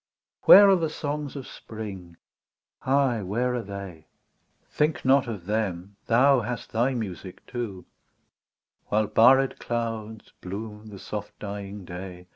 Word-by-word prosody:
Where 200 +1 +10
are 195 - +6
the 165 -3 -1
songs 150 -2 -4
of 135 -3 -6
Spring? 95 -6 -9 0.7
Ay, 130 -4 +2
where 120 +7 -1
are 125 - -1
they 100 -6 -9 0.3
.'' - - -44
Think 150 -1 0
not 135 0 +4
of 105 -7 -6
them, 100 -2 -2
thou 130 +3 +5
hast 120 +1 -5
thy 125 +4 +1
music 95 -4 -6
too, 115 -7 -6 0.5
— - - -55
While 110 +1 +2
barred 130 +5 +4
clouds 115 -2 -4
bloom 105 +3 -7
the 105 -2 -10
soft 105 +1 -7
dying 100 -1 -7
day. 90 0 -8
110 Hz, 140 wpm, -26 LUFS, 100-125 Hz, 0.7 s, Where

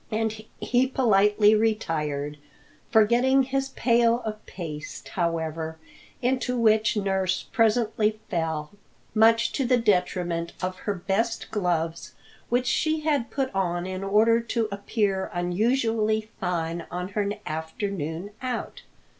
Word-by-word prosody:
And 220 -1 -2
he 250 +1 +2
politely 210 -4 +4
retired, 150 -10 -1 0.5
forgetting 240 +5 +4
his 270 +1 -1
pail 235 -1 +2
of 215 0 -5
paste, 150 -7 -7
however, 160 -2 -2 0.5
into 250 0 0
which 220 -1 +3
nurse 190 -2 0
presently 220 -1 +2
fell, 160 -4 -2 0.4
much 230 +1 +4
to 275 - -1
the 250 0 +3
detriment 180 -5 0
of 185 0 -2
her 205 - +1
best 210 +6 -1
gloves 170 -5 -1 0.4
which 245 +1 +1
she 310 +4 +1
had 290 -6 0
put 270 -2 -2
on 175 -2 -1
in 185 +1 -4
order 220 +4 +4
to 230 -1 -1
appear 200 -1 -1
unusually 220 +3 +1
fine 170 -3 -2
on 180 +1 -4
her 205 0 -1 0.2
afternoon 160 +2 -4
out. 255 -2 -4
210 Hz, 120 wpm, -26 LUFS, 175-230 Hz, 0.5 s, politely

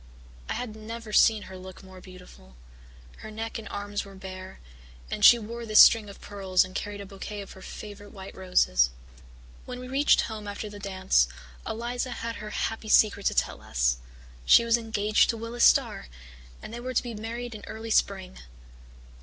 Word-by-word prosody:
I - - 0
had 235 -3 -5
never 220 0 -8
seen 215 -1 +5
her 190 - -10
look 185 +1 -11
more 190 -1 -13
beautiful 180 - -15 0.6
her - - -9
neck 225 +1 -5
and 215 -2 -9
arms 205 0 -4
were 195 -1 -13
bare, 190 -1 -9 0.5
and - - -3
she 240 - +10
wore 235 +1 -7
this 215 -2 +4
string 220 -3 +8
of 200 - -12
pearls 190 -3 +1
and 185 - -12
carried 205 +1 -4
a - - -7
bouquet 200 +1 -7
of 195 - -10
her 190 - -13
favourite 205 +1 -9
white 190 -1 -10
roses. 120 - +3 0.8
"When 250 0 -7
we 255 - -8
reached 275 +3 +4
home 215 -2 -6
after 205 +1 -6
the 205 - -9
dance, 190 - +2 0.4
Eliza 240 +3 -3
had 230 0 -5
her 210 - -7
happy 220 +1 -3
secret 210 -2 +4
to - - 0
tell - - 0
us. - - 0 0.5
She 230 - +6
was 230 0 +4
engaged 220 -2 +2
to 230 - 0
Willis 230 +2 -2
Starr, - - +3 0.6
and - - -8
they 235 - -5
were 255 +1 -5
to - - +2
be 240 -2 -6
married 230 +3 -6
in 210 -2 -9
early 225 +1 -6
spring. 190 -3 0
210 Hz, 185 wpm, -27 LUFS, 190-230 Hz, 0.8 s, she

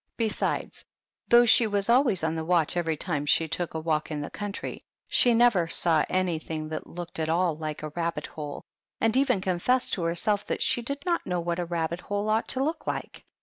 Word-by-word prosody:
Besides, 225 -2 -2 0.4
though 240 0 +7
she 230 0 +5
was 200 -1 -1
always 235 - +3
on 160 0 +1
the 160 -1 -3
watch 170 -1 +1
every 165 -3 0
time 150 -3 -2
she 160 +2 +3
took 165 +1 -3
a - - -1
walk 155 -1 -1
in 150 -2 -3
the 145 - -5
country, 205 -1 -5 0.3
she 240 -2 +4
never 225 -8 +4
saw 165 -2 +3
anything 160 -4 -2
that 155 - -5
looked 175 -1 -7
at 160 0 -1
all 170 0 +2
like 155 -1 -5
a 155 - -3
rabbit 170 +2 -3
hole, 150 -2 -7 0.4
and 225 +1 +2
even 260 -7 +2
confessed 190 +8 +1
to 185 - -1
herself 200 +5 0
that - - -1
she 240 - +1
did 280 +4 -5
not 345 -1 0
know 180 -1 0
what 170 0 -2
a 175 - -1
rabbit 170 +1 -2
hole 205 +1 -2
ought 220 +1 +1
to 265 - 0
look 315 +4 -3
like. - - -5
175 Hz, 210 wpm, -27 LUFS, 160-220 Hz, 0.4 s, though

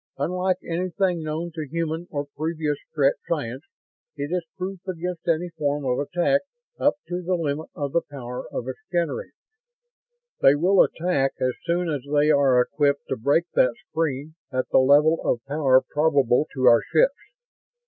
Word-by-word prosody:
Unlike 180 +5 0
anything 180 +1 -1
known 160 +2 -4
to 155 -2 -5
human 165 +1 -3
or 145 -1 -3
previous 155 -2 -2
Strett 140 -2 +2
science, 135 -6 -2 0.5
it 145 +1 -4
is 180 -1 0
proof 185 +1 -4
against 180 -1 -4
any 170 +1 +1
form 145 -3 -2
of 125 -1 0
attack 175 - +1 0.4
up 290 - +3
to 180 0 -3
the 180 +1 0
limit 155 -2 -2
of 145 -2 -3
the 170 - +2
power 125 -3 -7
of 120 - -4
its 130 - -5
generators. 175 - -2 1.1
They 135 - +6
will 180 +6 +4
attack 160 -6 +1
as 130 0 +1
soon 175 +1 0
as 150 -4 -2
they 150 +1 +4
are 140 -4 +4
equipped 140 +3 +1
to - - 0
break 140 +7 +2
that 125 - +3 0.2
screen 155 -1 -2 0.2
at 130 -1 -2
the - - +5
level 145 +5 +5
of 120 - -1
power 135 -2 +3
probable 145 -3 +2
to 130 -1 0
our 120 -1 +7
ships. - - +3
155 Hz, 165 wpm, -24 LUFS, 140-175 Hz, 1.1 s, our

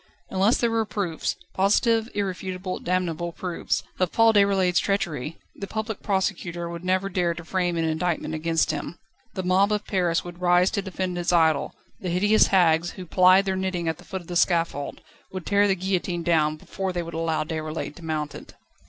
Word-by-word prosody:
Unless 195 +5 +3
there 235 -1 +1
were 225 0 +2
proofs 195 -6 -2 0.2
positive, 225 +4 +2
irrefutable, 185 -1 -3
damnable 175 -1 -1
proofs 175 0 -2 0.2
of 185 -2 +1
Paul 225 0 +5
Déroulède's 195 -3 +3
treachery, 165 -7 -2 0.2
the 200 - -6
Public 220 0 -4
Prosecutor 185 -3 -1
would 170 0 -7
never 185 +1 +1
dare 180 -3 0
to 170 0 -9
frame 175 -1 0
an 165 - +1
indictment 160 0 -1
against 165 +1 +1
him. 150 +2 -5 0.4
The 185 - -2
mob 190 +3 +3
of 210 0 -1
Paris 175 -4 +1
would 175 0 -10
rise 180 +1 +4
to 200 - -1
defend 185 -2 -3
its 175 - 0
idol; 160 -4 +2 0.2
the 185 - -4
hideous 205 +5 +4
hags, 175 -3 +3
who 185 - -8
plied 185 +2 +5
their 190 -1 0
knitting 185 -3 -2
at 160 +1 -2
the - - -13
foot 190 0 -6
of 170 - -17
the 175 - -5
scaffold, 165 -5 +1 0.3
would 185 -2 -6
tear 205 0 +3
the 195 - +2
guillotine 180 -2 -2
down, 155 -3 +2
before 190 +4 -4
they 175 -1 -2
would 170 - -8
allow 165 -1 0
Déroulède 155 -2 -4
to 170 - -12
mount 155 -2 -3
it. - - -11
180 Hz, 190 wpm, -25 LUFS, 165-195 Hz, 0.4 s, Paul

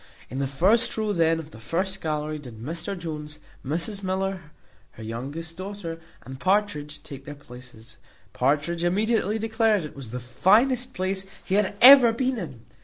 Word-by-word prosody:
In 130 - -4
the 140 - 0
first 190 - +3
row 215 -1 0
then 165 -2 +3
of 160 -1 -8
the 110 - -12
first 190 - -2
gallery 155 -1 -2
did 125 -6 -11
Mr 165 - -4
Jones, 150 -3 -6 0.3
Mrs 170 +9 -1
Miller, 190 -3 -3 0.4
her 110 - -11
youngest 140 +9 -6
daughter, 185 -4 -6 0.2
and 130 +1 -9
Partridge, 185 -7 0
take 135 -1 -10
their 145 - -7
places. 125 -4 -14 0.4
Partridge 150 +6 0
immediately 210 +3 +1
declared 220 -3 +1
it 150 - -10
was 135 -5 -9
the 125 +2 -5
finest 240 - +2
place 190 +1 -2 0.2
he - - -3
had 205 0 +2
ever 255 -2 +10
been 255 +1 -1
in. 135 - -7
170 Hz, 165 wpm, -25 LUFS, 145-205 Hz, 0.4 s, ever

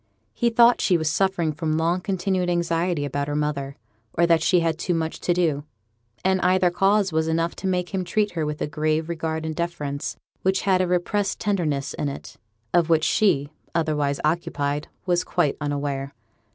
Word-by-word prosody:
He 235 - +1
thought 235 +1 +5
she 180 - +3
was 160 -1 0
suffering 185 -5 +1
from 155 0 -1
long 170 +3 +1
continued 185 -2 -1
anxiety 170 -2 0
about 145 0 -2
her 145 - -2
mother, 145 -2 -2 0.4
or 170 - +3
that 165 -1 +4
she 175 +2 +3
had 165 -1 0
too 175 0 0
much 160 0 -2
to - - 0
do; 165 -5 +1 0.6
and 190 -1 +2
either 180 0 +3
cause 195 +1 +2
was 160 0 +1
enough 165 +1 0
to 190 - -3
make 180 -1 0
him 190 -1 -2
treat 210 +3 0
her 165 -2 -2
with 150 0 -3
a - - -1
grave 155 +2 -1
regard 160 -1 -3
and 160 -1 -3
deference 150 -4 -3 0.2
which 190 +1 +1
had 190 -2 +3
a 185 - +1
repressed 190 +3 0
tenderness 155 -9 -1
in 145 - -2
it, 140 - -8 0.4
of 170 -2 +3
which 160 -1 +4
she, 155 -10 +2 0.2
otherwise 150 -4 0
occupied, 150 -3 -1 0.2
was 175 -1 +2
quite 150 -6 +1
unaware. 140 -1 -3
165 Hz, 185 wpm, -24 LUFS, 150-180 Hz, 0.6 s, thought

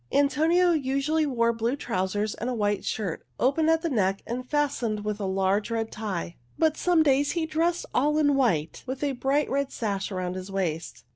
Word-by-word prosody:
Antonio 320 +6 +3
usually 300 +1 +1
wore 235 -3 +2
blue 230 +3 -1
trousers 205 -4 -1
and 235 - -4
a 250 - -2
white 205 -2 0
shirt, 200 -7 -3 0.2
open 310 +5 +2
at 325 +1 +3
the 335 - 0
neck 195 -5 +1
and 250 +2 -5
fastened 250 -8 0
with 210 0 -2
a 200 - -2
large 195 +2 +1
red 225 -1 -2
tie. 190 -6 -4 0.2
But 315 -1 +3
some 345 -2 +3
days 285 0 +2
he 335 -2 0
dressed 330 +2 0
all 295 +4 +2
in 290 -2 +3
white, 185 - +1
with 260 +2 -4
a 285 - +1
bright 275 +3 +1
red 280 0 -1
sash 200 -4 -2
around 180 -1 -2
his 185 +1 -7
waist. 170 -4 -3
250 Hz, 195 wpm, -26 LUFS, 205-295 Hz, 0.2 s, Antonio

